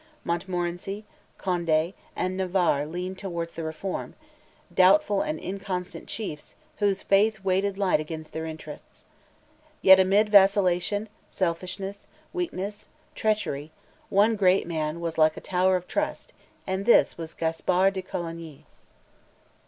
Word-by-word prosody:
Montmorency, 175 +3 -3 0.3
Conde, 170 -2 0 0.2
and 185 0 -1
Navarre 180 -6 +1
leaned 180 +3 -5
towards 170 -4 -4
the 165 - -6
Reform, 160 +4 -4 0.6
doubtful 195 +2 +5
and 305 0 -2
inconstant 185 -1 -5
chiefs, 175 -9 -6 0.2
whose 200 -2 +1
faith 210 +1 +3
weighed 195 +1 +1
light 195 -5 +2
against 155 0 -6
their 160 0 -4
interests. 155 -2 -10 0.8
Yet, 190 0 +9
amid 200 +3 +4
vacillation, 200 0 +4 0.2
selfishness, 190 +3 -3 0.3
weakness, 210 - -4 0.2
treachery, 185 -9 -1 0.4
one 210 +3 +4
great 190 -2 +3
man 160 -1 -3
was 165 -1 -3
like 155 0 +4
a - - -3
tower 185 0 +2
of 180 0 -3
trust, - - -3 0.3
and 190 +2 -3
this 240 - +5
was 165 -1 -7
Gaspar 180 +4 +2
de 190 -1 -4
Coligny. 165 -4 -7
185 Hz, 120 wpm, -26 LUFS, 170-195 Hz, 0.8 s, Yet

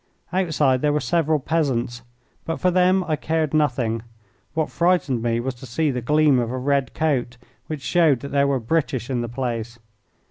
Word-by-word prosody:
Outside 155 -8 +2
there 150 - +2
were 150 - +2
several 160 -1 +1
peasants, 130 -5 -1 0.4
but 165 - -3
for 185 - +2
them 185 +1 +3
I 160 -3 -1
cared 155 0 -1
nothing. 125 -7 +1 0.5
What 160 -1 -1
frightened 170 -8 +1
me 115 0 0
was 130 +2 -2
to 125 +1 -12
see 150 +5 0
the 125 -1 -3
gleam 150 +1 +3
of 120 -2 -1
a 130 - -3
red 135 0 0
coat, 130 -6 0 0.3
which 150 -3 -5
showed 160 -7 +3
that 140 - -7
there 140 0 +3
were 140 -2 +1
British 130 -1 -1
in 125 -2 0
the 120 - -4
place. 120 -1 -4
140 Hz, 185 wpm, -22 LUFS, 120-160 Hz, 0.5 s, them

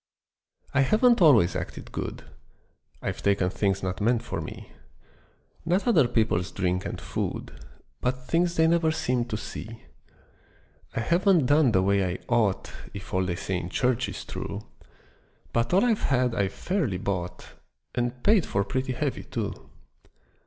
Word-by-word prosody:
I 135 - +4
HAVEN'T 225 - +4
always 125 - +6
acted - - -6
good: - - -5 0.8
I've - - -3
taken 100 -2 +2
things 95 0 0
not 95 0 -3
meant 115 +2 +2
for - - -4
me; - - -9 0.9
Not 180 +7 +1
other 160 - +5
people's 110 -7 +1
drink 90 -1 -1
and - - -5
food, - - -4 0.5
But 125 0 -1
things 170 +4 +1
they 160 - +4
never 165 -1 +3
seemed 125 -6 0
to 105 - -2
see. 110 +1 -8 1.1
I - - 0
haven't 170 - +3
done 145 -1 +4
the 95 -3 +3
way 100 0 +3
I 90 0 -1
ought 110 -5 +1 0.2
If 100 - -8
all 95 0 +2
they 85 - -1
say 95 +1 -2
in 90 0 -5
church 125 +3 +1
is - - -7
true, - - -5 0.9
But 115 0 +1
all 195 +6 +4
I've 225 -3 +2
had 125 -2 +2
I've 100 -4 0
fairly 165 - -1
bought, 90 -2 -4 0.4
And 120 0 -2
paid 205 -5 +4
for 100 - +1
pretty 130 +5 -2
heavy 135 +2 -2
too. - - -5
120 Hz, 155 wpm, -27 LUFS, 100-155 Hz, 1.1 s, always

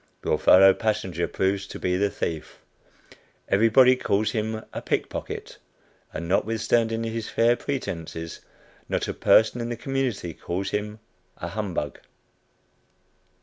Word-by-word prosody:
Your - - +1
fellow 95 +1 +7
passenger 95 -6 -1
proves 95 0 -1
to - - -8
be 90 0 0
the 100 +2 +2
thief. 80 -4 -4 0.9
Everybody 115 +5 +6
calls 105 -3 0
him 110 -1 -2
a - - -4
"pickpocket," - - -4 0.5
and 85 - -5
not 95 - +2
withstanding 115 +1 0
his 115 -1 -4
"fair 120 +1 +3
pretences," 85 - -5 0.5
not - - -1
a - - -2
person 110 +2 +4
in 115 - -3
the 120 - -3
community 125 -9 -2
calls 95 +5 -4
him 105 +1 -3 0.4
a - - -5
"humbug." 95 -9 -3
105 Hz, 130 wpm, -25 LUFS, 95-115 Hz, 0.9 s, fellow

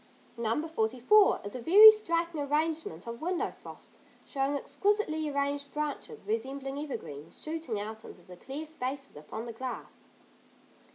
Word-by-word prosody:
No. 235 +7 -1
44 255 - +3
is 205 - -6
a 250 - -5
very 415 - +10
striking 335 -6 -1
arrangement 300 - -1
of 235 0 -6
window 355 +2 -1
frost, - - -13 0.3
showing 275 0 -1
exquisitely 315 +2 0
arranged 280 0 -2
branches, 300 +9 -4
resembling 275 -10 -3
evergreens, 160 - -7
shooting 310 -9 -4
out 220 +1 -6
into 175 - -12
the 180 - -12
clear 275 - -7
spaces 275 -3 -5
upon 155 +10 -7
the 235 - -6
glass. 255 +3 -7
280 Hz, 135 wpm, -30 LUFS, 235-320 Hz, 0.3 s, very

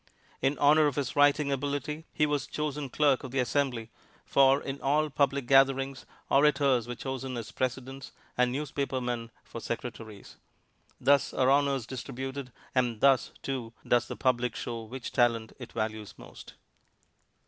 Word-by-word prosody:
In 135 +2 +1
honor 150 +1 +5
of 145 - -2
his 140 -3 -2
writing 145 0 +4
ability, 145 +3 -3
he 150 - +2
was 145 -1 -1
chosen 150 -2 -3
clerk 145 -1 +2
of 130 - -6
the 135 - -4
Assembly, 125 -2 0 0.3
for 135 0 +5
in 135 0 -6
all 150 +2 +1
public 140 -1 +1
gatherings 135 0 +3 0.2
orators 140 -4 +3
are 120 - -4
chosen 130 0 -5
as 115 -2 -6
presidents 130 +1 -4 0.2
and 125 0 +2
newspapermen 130 -4 -3
for 115 - -9
secretaries. 115 -3 -7 0.6
Thus 140 +2 +3
are 130 0 +3
honors 140 -3 +2
distributed, 130 +1 -6 0.2
and 120 -4 +1
thus, 135 0 +4
too, 125 -4 -4
does 120 - +3
the - - -5
public 125 -2 +1
show 115 -1 -4
which 125 +2 -7
talent 115 -2 +1
it - - -9
values 110 -1 -4
most. - - -13
135 Hz, 150 wpm, -29 LUFS, 120-140 Hz, 0.6 s, honor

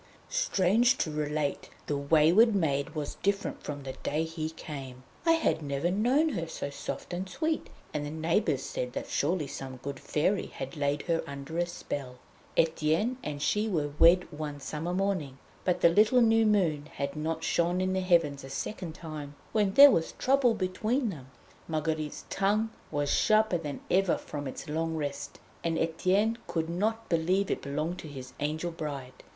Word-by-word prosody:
Strange 240 - +3
to 155 - -1
relate, 150 -1 -2 0.2
the 145 - -1
wayward 160 +10 +5
maid 140 -7 0
was 150 -2 -4
different 200 0 -1
from 145 -1 -6
the 135 -1 -5
day 150 +2 0
he 160 -1 -3
came. 135 -5 -8 0.2
I 330 - +7
had 325 - +1
never 140 +4 -1
known 250 - +3
her 170 - -3
so 145 -3 -5
soft 140 - -6
and 185 +2 -3
sweet, 315 - -1 0.2
and 145 - -1
the 145 - -4
neighbours 160 -1 0
said 125 0 -4
that - - -3
surely 160 +1 0
some 135 -1 -7
good 140 -1 -5
fairy 185 +6 0
had 135 0 -7
laid 145 -1 0
her 165 -2 0
under 140 +4 -5
a 175 - +1
spell. 140 -6 -5 0.4
Etienne 165 +9 +2
and 145 -5 -4
she 210 +1 +1
were 150 -6 0
wed 175 +2 +7
one 150 -1 -5
summer 150 +5 -4
morning, 180 -8 -1 0.3
but 180 - +1
the - - +7
little 215 +8 +5
new 225 -1 +5
moon 165 -8 +2
had 140 0 -3
not 160 +1 -2
shone 175 +1 +1
in 185 0 0
the 190 - +1
heavens 165 -6 +2
a 135 - -8
second 165 +4 -5
time 155 -4 -7 0.2
when 205 -3 +1
there 285 0 +11
was 165 - 0
trouble 260 -3 +3
between 215 +6 0
them. 135 -7 -10 0.4
Marguerite's 155 -1 -2
tongue 210 +3 +1 0.2
was 145 -1 -1
sharper 215 -5 +3
than 145 -4 -5
ever 190 -1 +3
from 145 -2 -6
its 130 - -7
long 160 +2 -1
rest, 145 -3 -4 0.3
and 165 -1 0
Etienne 190 +8 +1
could 165 0 -2
not 220 +6 -1
believe 180 +4 +1
it - - -1
belonged 155 +5 -3
to - - -8
his 130 -3 -9
'angel' 155 +4 -2
bride. 140 -5 -5
165 Hz, 175 wpm, -29 LUFS, 145-195 Hz, 0.4 s, there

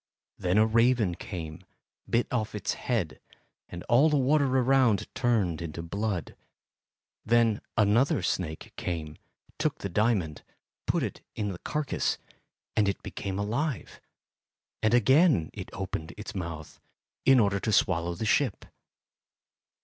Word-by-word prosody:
Then 90 +2 +1
a 110 - +6
raven 115 -3 +3
came, 85 -1 -7 0.5
bit 120 +1 +2
off 110 -4 -1
its 100 -1 -1
head, 110 -10 -2 0.5
and 90 0 -7
all 130 +7 +4
water 145 0 +3
around 130 -5 +3
turned 105 -10 +1
into 85 0 -5
blood. 100 +1 -3 0.9
Then 115 -1 +3 0.2
another 110 0 +3
snake 80 -3 -3
came, 80 -3 -4 0.4
took 155 -1 0
the 100 - -5
diamond, 95 -6 0 0.5
put - - +1
it - - -4
in 105 -1 -2
the 90 -3 -6
carcass, 150 -2 -1 0.6
and 105 -2 +3
it 100 - -4
became 95 -1 -4
alive; 120 +7 -2 0.8
and 110 +2 +3
again 130 - +4
it 95 -3 -7
opened 85 -4 -5
its 105 - -7
mouth, 80 -5 -6 0.4
in 135 -1 +6
order 100 -2 +2
to 110 - -1
swallow 85 -3 +2
the 110 - -3
ship. 115 -1 +1
105 Hz, 130 wpm, -28 LUFS, 90-120 Hz, 0.9 s, a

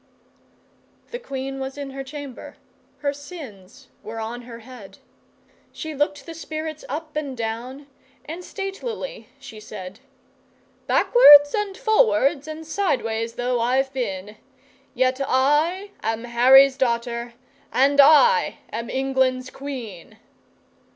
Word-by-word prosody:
The 485 - -5
Queen 270 - -5
was 265 +1 -5
in 280 -1 -6
her 270 0 -6
chamber; 280 -2 -9 0.4
her 285 -1 0
sins 280 - -12
were 225 +1 -7
on 230 +2 -5
her 235 -1 -11
head; 220 -5 -13 0.7
She 315 -1 -6
looked 290 0 -2
the 330 - -8
spirits 310 -1 -6
up 310 +3 -6
and 285 -4 -4
down 235 +5 -5 0.4
and 325 +5 -7
statelily 395 - -6
she 270 -6 -11
said: 200 -2 -9 0.9
'Backwards 290 -12 +7
and 415 -2 -2
forwards 285 - +2
and 315 +1 -7
sideways 230 - -1
though 245 0 -1
I've 265 +3 +1
been, 210 -5 -4 0.6
Yet 255 +1 +1
I 300 +10 +1
am 225 +1 -2
Harry's 260 +3 +6
daughter 235 -1 -1 0.4
and 280 +2 +5
I 315 - +5 0.2
am 230 +1 -4
England's 260 -1 0
Queen! 230 -8 -8
270 Hz, 115 wpm, -23 LUFS, 235-300 Hz, 0.9 s, Backwards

